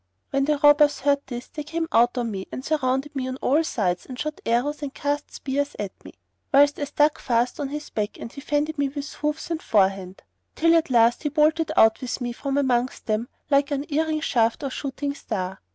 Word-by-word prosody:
When 275 0 +1
the 300 0 +1
robbers 290 0 +5
heard 280 0 +2
this, 245 -1 -6
they 300 - -6
came 325 +2 -3
out 240 +2 +3
on 235 -2 -1
me 190 -2 -5
and 260 - -6
surrounded 275 -1 0
me 260 -1 -2
on 260 - -3
all 290 +5 +2
sides 185 - -1
and 255 - -8
shot 305 0 -4
arrows 255 +6 0
and 285 -2 -4
cast 290 +1 -2
spears 285 +1 -3
at 200 -2 -4
me, - - -11 0.4
whilst 285 +1 +5
I 290 - -1
stuck 295 +1 +2
fast 240 +2 0
on 285 - -1
his 295 +1 -6
back 210 -1 -3
and 230 - -8
he 280 - -8
fended 295 +2 -1
me 280 -1 +1
with 285 +1 -6
hoofs 300 +2 -3
and 330 -1 -2
forehand,[FN#91] 195 -2 +1 0.3
till 330 +1 +4
at 325 -3 +2
last 235 -1 +4
he 295 - -1
bolted 310 +2 +2
out 220 0 +5
with 255 0 -3
me 245 -1 -3
from 275 +2 -3
amongst 255 -2 0
them 220 +2 -1 0.2
like 280 0 +4
unerring 305 +2 -1
shaft 230 -3 +1
or 275 - -2
shooting 280 +1 -3
star. 190 -8 -5
280 Hz, 215 wpm, -24 LUFS, 240-295 Hz, 0.4 s, robbers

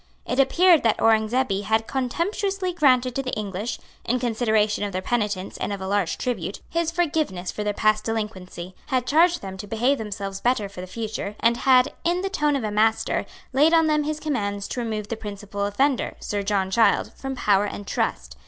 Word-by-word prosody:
It 250 - -2
appeared 335 +5 +5
that 225 -2 +2
Aurengzebe 220 -1 +2
had 220 +2 +1
contemptuously 365 - -1
granted 255 -6 +3
to 270 - -1
the 255 -1 -5
English, 205 +2 -3 0.3
in 245 +2 0
consideration 220 -3 +1
of 200 -2 -3
their 185 - -2
penitence 205 -4 -2
and - - -3
of 200 - -3
a 190 - -5
large 195 -4 0
tribute, 200 -7 -3
his 335 -1 0
forgiveness 310 - -1
for 210 - -4
their 210 - 0
past 215 0 +2
delinquency, 190 -5 -4
had 255 -3 0
charged 335 - +3
them 190 -1 -6
to 205 - -7
behave 245 +6 +1
themselves 200 -2 -5
better 240 -4 +1
for 195 -2 -9
the 185 - -7
future, 215 0 -5
and 230 +1 +3
had, 255 +2 +4
in 350 +1 +1
the 390 - -2
tone 295 -5 +1
of 270 - -2
a 215 - -2
master, 220 +1 +1 0.3
laid 305 +5 +5
on 325 -1 +5
them 305 -1 +2
his 305 +1 -3
commands 205 -10 -2
to - - -3
remove 215 -3 -3
the 230 - -2
principal 205 -1 -4
offender, 265 +6 0
Sir 205 -1 -2
John 195 -1 0
Child, 225 +3 +3
from 270 0 -5
power 205 -4 +3
and 205 0 -6
trust. - - -2
225 Hz, 200 wpm, -24 LUFS, 205-270 Hz, 0.3 s, appeared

